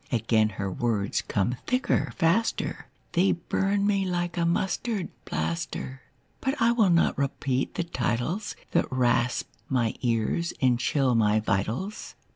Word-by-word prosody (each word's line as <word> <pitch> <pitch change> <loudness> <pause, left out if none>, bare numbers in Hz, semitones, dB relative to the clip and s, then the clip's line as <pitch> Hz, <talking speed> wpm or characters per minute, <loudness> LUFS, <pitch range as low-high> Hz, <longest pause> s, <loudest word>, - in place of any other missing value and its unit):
Again 110 -2 +2
her 95 -1 -2
words 105 -1 0
come 115 +5 -1
thicker, 255 +1 +1
faster, 190 +6 0 0.2
They 185 +2 +3
burn 195 +3 0
me 200 -1 +2
like 175 -2 -2
a 170 -1 +1
mustard 190 +3 -1 0.2
plaster. 150 -6 -3 0.4
But 270 +3 -1
I 230 - +4
will 225 -5 +3
not 170 -4 +3
repeat 135 -1 -1
the - - 0
titles 170 - -2 0.2
That - - +1
rasp 125 -1 +1 0.2
my 120 -4 +1
ears 120 +8 0
and 125 -3 +3
chill 130 +1 +2
my 110 -2 +3
vitals. 110 - -2
140 Hz, 135 wpm, -27 LUFS, 120-190 Hz, 0.4 s, I